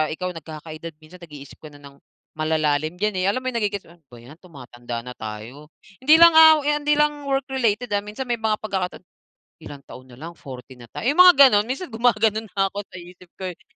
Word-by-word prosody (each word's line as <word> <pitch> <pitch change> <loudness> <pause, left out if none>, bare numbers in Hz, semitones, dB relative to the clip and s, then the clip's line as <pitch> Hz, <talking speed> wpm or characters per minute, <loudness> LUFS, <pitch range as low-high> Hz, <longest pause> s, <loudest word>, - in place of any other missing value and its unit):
ikaw 180 +2 -4
nagkaka-edad, 160 +1 -9
minsan 165 +4 -16
nag-iisip 145 -4 -12
ko 155 - -11
na 145 - -15
ng 140 -1 -15 0.4
malalalim 155 0 -1
dyan, 210 -1 -1
eh. 185 - -1
Alam 230 +6 -1
mo - - -2
yung 235 - -4
nagegets 205 -2 -3
mo, 170 - -18 0.2
'ba 120 - -13
yan, 135 +6 -14
tumatanda 120 -8 -9
na 125 - -8
tayo, 115 +8 -9 0.3
hindi 305 +4 +6
lang 335 0 +8 0.3
hindi 295 0 0
lang 295 -1 0
work 270 -1 -1
related, 245 -2 -1
ah, 200 - -1
minsan, 215 +5 -7
may 240 -1 -1
mga 220 -1 -1
pagkakataon. 190 -4 -4 0.6
Ilang 140 -2 -11
taon 130 0 -13
na 120 - -15
lang, 165 +3 -9
40 130 -1 -11
na 120 - -14
tayo, - - -7
ay, - - +4
mga 360 0 +9 0.2
ganun 205 -1 +2
minsan, 275 +7 -5
gumaganon 225 -2 0
na 195 0 +1
ako 205 0 -6
sa - - -17
isip 180 +1 -15
ko, 185 -1 -4
eh. 175 - -18
180 Hz, 215 wpm, -22 LUFS, 145-225 Hz, 0.6 s, mga